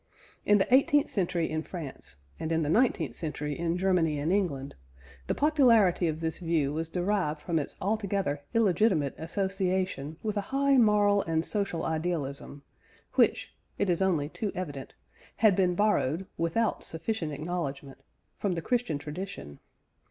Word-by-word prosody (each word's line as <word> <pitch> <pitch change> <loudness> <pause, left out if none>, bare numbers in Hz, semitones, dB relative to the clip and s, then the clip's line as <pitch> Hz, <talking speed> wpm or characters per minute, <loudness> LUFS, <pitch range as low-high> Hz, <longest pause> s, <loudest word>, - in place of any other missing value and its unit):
In 210 - +6
the 195 +5 +1
eighteenth 280 +2 +5
century 175 -4 0
in 155 0 -2
France, 150 - -7 0.2
and 160 - -3
in 165 0 +1
the 145 - -1
nineteenth 170 - +2
century 150 +1 -4
in 170 0 0
Germany 180 -5 +2
and 155 +5 0
England, 145 -9 -1 0.5
the - - 0
popularity 235 - +4
of 155 -1 -2
this 160 -1 -2
view 165 -5 0
was 160 +1 -3
derived 180 -4 0
from 165 +1 -1
its 145 - -5
altogether 200 -7 -1
illegitimate 195 -8 +3
association 185 -4 -2
with 215 -1 -2
a - - +1
high 275 +1 +3
moral 205 -3 +4
and 165 -1 -1
social 200 -6 -2
idealism, 155 -4 -3 0.5
which - - +2 0.2
(it 190 - +1
is 175 - 0
only 170 -7 +2
too 205 +5 -4
evident) 145 -8 -6 0.4
had 215 -4 +4
been 180 -2 +2
borrowed 190 -5 +1
without 170 +7 0
sufficient 165 0 -2
acknowledgment 145 -3 -4 0.4
from 200 -3 0
the 165 - -3
Christian 245 - 0
tradition. 150 - -7
175 Hz, 150 wpm, -29 LUFS, 155-205 Hz, 0.5 s, In